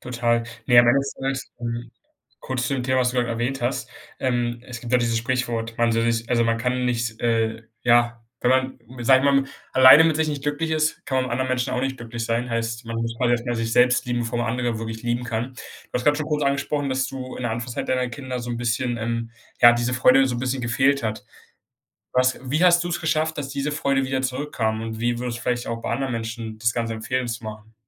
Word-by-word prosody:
Total. 120 Hz, -1 st, 0 dB, 0.2 s
Ne, 120 Hz, -2 st, +6 dB
am 120 Hz, 0 st, +7 dB
Ende 135 Hz, +3 st, +5 dB
des 140 Hz, -, -5 dB
Tages, 135 Hz, 0 st, -4 dB
hm 120 Hz, 0 st, -5 dB, 0.6 s
kurz 125 Hz, -2 st, -1 dB
zu 135 Hz, -, -1 dB
dem 130 Hz, -2 st, -2 dB
Thema, 130 Hz, 0 st, +1 dB
was 125 Hz, -1 st, +2 dB
du -, -, -8 dB
grad 125 Hz, -1 st, +1 dB
erwähnt 120 Hz, +3 st, -2 dB
hast. 125 Hz, +1 st, -2 dB, 0.3 s
Ähm, 120 Hz, -2 st, -1 dB
es 120 Hz, -2 st, -7 dB
gibt 120 Hz, -, -7 dB
doch 125 Hz, -, +5 dB
dieses 115 Hz, -1 st, +1 dB
Sprichwort: 115 Hz, -2 st, -2 dB
Man 115 Hz, -1 st, +2 dB
soll 115 Hz, +1 st, +2 dB
sich 115 Hz, 0 st, -3 dB
also 120 Hz, -1 st, +3 dB
man 115 Hz, 0 st, +1 dB
kann 125 Hz, +2 st, -1 dB
nicht, 120 Hz, -2 st, -2 dB
äh, 115 Hz, -1 st, 0 dB, 0.2 s
ja 120 Hz, 0 st, +3 dB, 0.2 s
wenn 125 Hz, -, +2 dB
man, 130 Hz, 0 st, +1 dB, 0.3 s
sag 130 Hz, +1 st, +7 dB
ich 130 Hz, -, -3 dB
mal, 140 Hz, -1 st, +4 dB, 0.3 s
alleine 130 Hz, +4 st, +9 dB
mit 160 Hz, -2 st, +2 dB
sich 160 Hz, 0 st, +1 dB
nicht 145 Hz, -2 st, -3 dB
glücklich 150 Hz, +3 st, -1 dB
ist, 155 Hz, 0 st, 0 dB
kann 135 Hz, -, -2 dB
man 130 Hz, -, +2 dB
mit 130 Hz, -, -5 dB
anderen 130 Hz, +2 st, 0 dB
Menschen 125 Hz, -1 st, -1 dB
auch 125 Hz, -, 0 dB
nicht 135 Hz, +1 st, -1 dB
glücklich 115 Hz, 0 st, -5 dB
sein. 115 Hz, +2 st, -1 dB
Heißt: 115 Hz, 0 st, -2 dB
Man 115 Hz, 0 st, -4 dB
muss 115 Hz, 0 st, -2 dB
quasi 125 Hz, -1 st, +2 dB
erstmal 120 Hz, 0 st, 0 dB
sich 115 Hz, 0 st, -2 dB
selbst 125 Hz, +3 st, +4 dB
lieben, 120 Hz, -1 st, -1 dB
bevor 120 Hz, 0 st, -2 dB
man 120 Hz, -, 0 dB
andere 120 Hz, -1 st, -1 dB
wirklich 115 Hz, 0 st, -6 dB
lieben 120 Hz, +1 st, -1 dB
kann. 115 Hz, +2 st, -3 dB
Du -, -, -13 dB
hast 125 Hz, -, -1 dB
grad 145 Hz, +2 st, +3 dB
schon 155 Hz, -, -2 dB
kurz 150 Hz, -1 st, -1 dB
angesprochen, 140 Hz, +1 st, 0 dB
dass 130 Hz, 0 st, 0 dB
du 130 Hz, 0 st, -7 dB
in -, -, -5 dB
der 120 Hz, -, -1 dB
Anfangszeit 120 Hz, +1 st, -4 dB
deiner 125 Hz, -1 st, 0 dB
Kinder 130 Hz, 0 st, -5 dB
so 120 Hz, 0 st, -6 dB
'n 120 Hz, -, -3 dB
bisschen, 120 Hz, +1 st, -1 dB
ähm 115 Hz, 0 st, -3 dB, 0.3 s
ja, 120 Hz, 0 st, +10 dB
diese 120 Hz, +1 st, 0 dB
Freude 130 Hz, +1 st, +5 dB
so 125 Hz, -, -2 dB
'n -, -, -3 dB
bisschen 130 Hz, +1 st, -2 dB
gefehlt 135 Hz, +4 st, +2 dB
hat. 110 Hz, -1 st, -3 dB, 0.9 s
Was 130 Hz, 0 st, +2 dB
wie 155 Hz, +6 st, +2 dB
hast 175 Hz, -1 st, +5 dB
du's 175 Hz, 0 st, -2 dB
geschafft, 155 Hz, 0 st, 0 dB
dass 140 Hz, -2 st, -3 dB
diese 140 Hz, +1 st, -2 dB
Freude 140 Hz, -3 st, +1 dB
wieder 130 Hz, 0 st, -1 dB
zurückkam? 125 Hz, -4 st, -2 dB
Und 110 Hz, 0 st, -5 dB
wie 120 Hz, 0 st, 0 dB
würdest 120 Hz, -1 st, -3 dB
du -, -, -10 dB
vielleicht 120 Hz, -1 st, -1 dB
auch 115 Hz, 0 st, -3 dB
bei -, -, -3 dB
anderen 135 Hz, -2 st, -1 dB
Menschen 115 Hz, -1 st, -5 dB
das 115 Hz, +1 st, +1 dB
Ganze 115 Hz, -1 st, -2 dB
empfehlen, 125 Hz, +3 st, -2 dB
zu 115 Hz, 0 st, -4 dB
machen? 110 Hz, 0 st, -9 dB
120 Hz, 245 wpm, -23 LUFS, 115-130 Hz, 0.9 s, ja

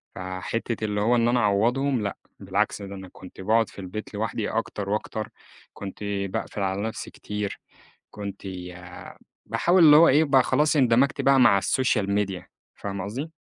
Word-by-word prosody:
فحتّة 95 Hz, +5 st, -4 dB
اللي 105 Hz, -1 st, -1 dB
هو 120 Hz, +3 st, +3 dB
إن 120 Hz, 0 st, +2 dB
أنا 120 Hz, 0 st, +2 dB
أعوّضهم، 120 Hz, +5 st, +2 dB
لأ، 100 Hz, -1 st, -3 dB, 0.2 s
بالعكس 100 Hz, +2 st, -1 dB
ده 100 Hz, 0 st, -7 dB
أنا 95 Hz, -1 st, -9 dB
كنت 95 Hz, 0 st, -12 dB
باقعد 110 Hz, +3 st, +2 dB
في -, -, -13 dB
البيت 100 Hz, +3 st, -7 dB
لوحدي 110 Hz, 0 st, -2 dB
أكتر 105 Hz, -3 st, -3 dB
وأكتر، 105 Hz, +1 st, -3 dB, 0.4 s
كنت 100 Hz, +1 st, -8 dB
باقفِل 100 Hz, 0 st, -3 dB
على 95 Hz, +1 st, -1 dB
نفسي 110 Hz, +1 st, -5 dB
كتير، 105 Hz, -1 st, -5 dB, 0.5 s
كنت 100 Hz, -1 st, -7 dB
ي 90 Hz, -2 st, -7 dB, 0.7 s
باحاول 175 Hz, 0 st, +3 dB
اللي 150 Hz, -1 st, +9 dB
هو 165 Hz, +2 st, +7 dB
إيه، 150 Hz, +4 st, +5 dB
بقى 135 Hz, -3 st, +4 dB
خلاص 150 Hz, +3 st, +2 dB
اندمجْت 130 Hz, +1 st, +3 dB
بقى 135 Hz, -1 st, +4 dB
مع 100 Hz, -5 st, +6 dB
السوشيال 105 Hz, -1 st, +1 dB
ميديا 100 Hz, -3 st, -2 dB, 0.3 s
فاهمة 100 Hz, -2 st, -5 dB
قصدي؟ 135 Hz, +11 st, -5 dB
105 Hz, 165 wpm, -25 LUFS, 100-120 Hz, 0.7 s, اللي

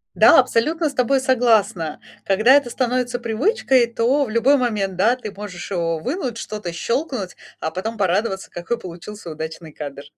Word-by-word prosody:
Да, -, -, +7 dB
абсолютно 315 Hz, +7 st, +1 dB
с 280 Hz, -, -9 dB
тобой 265 Hz, +1 st, +2 dB
согласна. 225 Hz, -, +1 dB, 0.2 s
Когда 215 Hz, +6 st, +4 dB
это 280 Hz, -3 st, +4 dB
становится 250 Hz, 0 st, -1 dB
привычкой, 250 Hz, -, +2 dB
то 245 Hz, +5 st, +1 dB
в 225 Hz, -, -8 dB
любой 245 Hz, +6 st, +3 dB
момент, 210 Hz, -7 st, -1 dB
да, 225 Hz, +7 st, +3 dB
ты 220 Hz, -5 st, -7 dB
можешь 200 Hz, -2 st, -8 dB
его 165 Hz, -3 st, 0 dB
вынуть, 255 Hz, -, -3 dB
что-то 210 Hz, -6 st, -5 dB
щелкнуть, 235 Hz, -, -3 dB, 0.2 s
а 160 Hz, -, -3 dB
потом 220 Hz, +6 st, -4 dB
порадоваться, 195 Hz, +1 st, -1 dB
какой 175 Hz, +7 st, -3 dB
получился 180 Hz, -1 st, -9 dB
удачный 160 Hz, +1 st, -7 dB
кадр. 145 Hz, -2 st, -7 dB
225 Hz, 160 wpm, -21 LUFS, 185-255 Hz, 0.2 s, Да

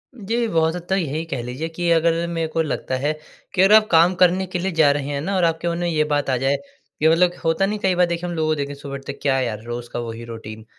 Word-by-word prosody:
जी, 230 Hz, +1 st, -1 dB
बहुत 160 Hz, -2 st, +1 dB
हद 180 Hz, -, -4 dB
तक 190 Hz, -, +2 dB
यही 155 Hz, 0 st, -2 dB
कह 165 Hz, -7 st, -4 dB
लीजिए 125 Hz, +7 st, -4 dB
कि 175 Hz, 0 st, -1 dB
अगर 165 Hz, +1 st, +2 dB
मेरे 165 Hz, -1 st, -2 dB
को 165 Hz, +1 st, -1 dB
लगता 140 Hz, -4 st, -2 dB
है 145 Hz, +3 st, 0 dB, 0.4 s
कि 185 Hz, -, +2 dB
अगर 195 Hz, +2 st, +6 dB
आप 215 Hz, 0 st, +5 dB
काम 170 Hz, +2 st, +5 dB
करने 185 Hz, +1 st, +3 dB
के 180 Hz, -1 st, -3 dB
लिए 190 Hz, +1 st, -1 dB
जा 160 Hz, -3 st, +4 dB
रहे 145 Hz, -1 st, -2 dB
हैं 140 Hz, -1 st, -2 dB
ना 195 Hz, +4 st, -2 dB
और 185 Hz, -, +1 dB
आपके 165 Hz, +1 st, 0 dB
मन 170 Hz, -, -2 dB
में 175 Hz, 0 st, -1 dB
ये 155 Hz, -2 st, +2 dB
बात 145 Hz, -2 st, -1 dB
आ 130 Hz, -, +2 dB
जाए, 135 Hz, +2 st, +1 dB, 0.4 s
कि 155 Hz, -, +3 dB
मतलब 175 Hz, +2 st, +4 dB
होता 165 Hz, +3 st, +2 dB
नहीं 210 Hz, +2 st, -2 dB
कई 190 Hz, -2 st, +1 dB
बार 180 Hz, -, +4 dB
देखे 170 Hz, 0 st, -3 dB
हम 175 Hz, -, -3 dB
लोगों 155 Hz, -1 st, -1 dB
को 155 Hz, -, +2 dB
देखे 140 Hz, -1 st, -4 dB
सुबह 140 Hz, 0 st, -9 dB
उठते 135 Hz, +1 st, -6 dB
ही -, -, -12 dB
क्या 135 Hz, -2 st, +2 dB
यार 110 Hz, -4 st, -3 dB
रोज़ 120 Hz, 0 st, -6 dB
का 120 Hz, -, -2 dB
वही 115 Hz, 0 st, -6 dB
रूटीन 110 Hz, -1 st, -9 dB
160 Hz, 290 wpm, -21 LUFS, 140-175 Hz, 0.4 s, अगर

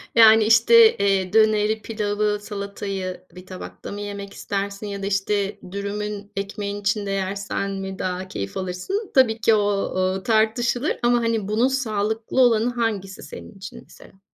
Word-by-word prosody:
Yani, 220 Hz, -1 st, +8 dB
işte, 440 Hz, -, +6 dB
eee, 195 Hz, -1 st, +1 dB
döneri, 215 Hz, 0 st, +3 dB
pilavı, 210 Hz, -1 st, -1 dB
salatayı 200 Hz, -2 st, -5 dB
bir 180 Hz, 0 st, -11 dB
tabakta 185 Hz, +1 st, -9 dB
mı 205 Hz, 0 st, -6 dB
yemek 200 Hz, -1 st, -6 dB
istersin 200 Hz, +1 st, -4 dB
ya 200 Hz, -1 st, -5 dB
da, -, -, -1 dB
işte, 200 Hz, 0 st, -1 dB
dürümün 205 Hz, 0 st, -5 dB
ekmeğin 200 Hz, +1 st, -4 dB
içinde 205 Hz, 0 st, -1 dB
yersen 195 Hz, +1 st, -2 dB
mi 195 Hz, -1 st, -5 dB
daha 185 Hz, 0 st, -3 dB
keyif 100 Hz, -, -5 dB
alırsın? 190 Hz, -, -4 dB
Tabii 235 Hz, -4 st, +4 dB
ki, 225 Hz, -, +4 dB
o 215 Hz, -, +4 dB
o, 190 Hz, -2 st, 0 dB
tartışılır 235 Hz, +4 st, +1 dB
ama, 240 Hz, 0 st, +4 dB
hani, 230 Hz, -3 st, -1 dB
bunun 220 Hz, +5 st, +2 dB
sağlıklı 225 Hz, -1 st, -1 dB
olanı 235 Hz, -1 st, +4 dB
hangisi 210 Hz, -5 st, -3 dB
senin -, -, -10 dB
için 190 Hz, 0 st, -9 dB
mesela? 190 Hz, -, -18 dB
205 Hz, 150 wpm, -23 LUFS, 195-220 Hz, -, Yani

